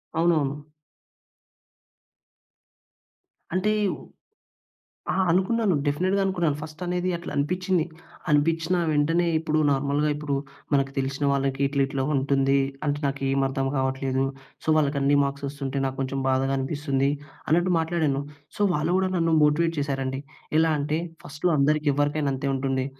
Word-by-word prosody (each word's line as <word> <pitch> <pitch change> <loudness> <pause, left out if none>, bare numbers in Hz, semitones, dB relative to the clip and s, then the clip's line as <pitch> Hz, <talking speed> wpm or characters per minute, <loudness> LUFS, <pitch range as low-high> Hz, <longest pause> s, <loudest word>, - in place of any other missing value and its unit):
అవునవును. 155 -4 +2 3.0
అంటే 210 +3 +2 1.4
ఆ! - - -1 0.2
అనుకున్నాను 195 +2 +2
డెఫినెట్‌గా 185 +7 +1
అనుకున్నాను. 175 -6 +1
ఫస్ట్ 155 0 -9
అనేది 180 +1 -1
అట్లా 170 - -8
అనిపించింది. 180 +4 +1 0.5
అనిపించిన 165 +4 +2 0.2
వెంటనే 165 +4 +2
ఇప్పుడు 155 -1 0
నార్మల్‍గా 140 +2 +1
ఇప్పుడు, 145 -1 -2 0.4
మనకు 135 -1 +2
తెలిసిన 135 +1 -1
వాళ్ళకి 135 0 0
ఇట్ల 140 0 0
ఇట్లా 135 -1 -2
ఉంటుంది. 135 0 +2 0.3
అంటే, 145 0 +1
నాకు 140 0 -2
ఏమి 135 0 +2
అర్థం 135 0 -1
కావట్లేదు. 130 0 0 0.4
సో, - - -14
వాళ్ళకి 145 -1 +1
అన్నీ 140 +1 +3
మార్క్స్ 140 0 -3
వస్తుంటే 140 -1 -4
నాకు 135 0 -3
కొంచెం 135 +1 -2
బాధగా 135 +1 +1
అనిపిస్తుంది. 135 0 0 0.4
అన్నట్టు 175 +3 +3
మాట్లాడాను. 160 -4 0 0.4
సో, - - -3
వాళ్ళు 155 +4 0
గూడా 190 0 +1
నన్ను 165 -1 +2
మోటివేట్ 165 +3 +2
చేసారండి. 135 -1 -2 0.4
ఎలా 160 0 +3
అంటే, 150 +3 -1 0.2
"ఫస్ట్‌లో 150 +5 -1
అందరికీ 150 +1 +2
ఎవరికైనా 145 0 0
అంతే 140 +1 -2
ఉంటుంది. 130 -1 -1
145 Hz, 130 wpm, -25 LUFS, 135-165 Hz, 3.0 s, అన్నీ